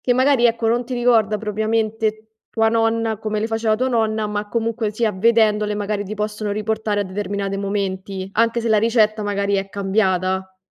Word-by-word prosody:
che 245 - +1
magari, 260 -1 +4
ecco, 230 -1 0
non 240 +1 +1
ti 255 - -5
ricorda 230 -4 +2
propriamente 220 0 -1 0.2
tua 225 -1 +2
nonna 225 -1 +1
come 215 -1 -2
le 215 - -1
faceva 225 -1 0
tua 255 +3 0
nonna, 220 -3 0
ma 210 0 -3
comunque 230 -1 -1
sia, 215 0 0
vedendole, 210 0 +2
magari, 205 0 -2
ti 210 - -6
possono 210 0 -3
riportare 215 0 -1
a 205 - -1
determinate 195 +1 -3
momenti, 195 -1 -3
anche 230 +2 +2
se 230 - -2
la 215 -1 +4
ricetta, 215 -1 +2
magari, 200 0 -1
è 195 0 -1
cambiata? 190 -2 0
215 Hz, 180 wpm, -20 LUFS, 205-225 Hz, 0.2 s, magari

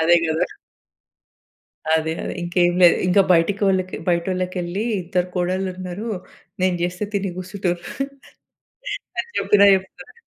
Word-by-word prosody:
అదే 170 +2 +5
కదా! 160 0 +1 1.5
అదే 160 0 0
అదే - - -4
ఇంకేమి 175 0 +2
లేదు. 175 - +7
ఇంక 185 +2 +4
బయటకి 185 +1 +2
బయటోళ్ళకి 185 +2 -1
వెళ్లి 175 +5 -2 0.2
"ఇద్దరు 180 +1 -1
కోడళ్ళు 185 +1 0
ఉన్నారు. 185 +4 -5 0.5
నేను 185 -1 +2
చేస్తే 180 +3 -2
తిని 195 -1 0
కుసుంటుర్రు" 185 -2 -3 1.4
అని 470 - -2
చెప్పినా 200 -1 +5
చెప్తరు. 190 - -5
180 Hz, 115 wpm, -22 LUFS, 175-190 Hz, 1.5 s, లేదు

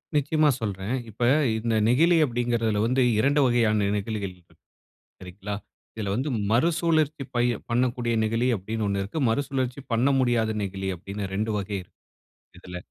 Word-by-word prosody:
நிச்சயமா 150 +1 +3
சொல்றேன். 100 +1 -3 0.2
இப்ப 110 +3 -13 0.4
இந்த 115 0 -1
நெகிழி 165 +9 +4
அப்படிங்கிறதுல 120 -4 0
வந்து 130 +2 +2 0.2
2 140 +5 +3
வகையான 110 -4 +2
நெகிழிகள் 100 -2 -4
இருக்கு, 85 -1 -26 0.6
சரிங்களா? 95 +3 -6 0.4
இதில 105 -3 -3
வந்து 130 +6 -1 0.2
மறுசுழற்சி 155 +2 +2
பய 120 0 +2 0.2
பண்ணக்கூடிய 120 0 0
நெகிழி 115 +3 0
அப்டின்னு 110 +2 -3
ஒண்ணு 100 0 -1
இருக்கு. 105 +11 -5
மறுசுழற்சி 130 +1 -1
பண்ண 120 +5 +3
முடியாத 120 -3 +2
நெகிழி 95 -1 -4
அப்டின்னு 100 +3 -6
2 110 +2 -1
வகை 100 0 -3
இருக்கு. 90 - -20 0.6
இதுல 90 0 -9
115 Hz, 140 wpm, -25 LUFS, 100-130 Hz, 0.6 s, நெகிழி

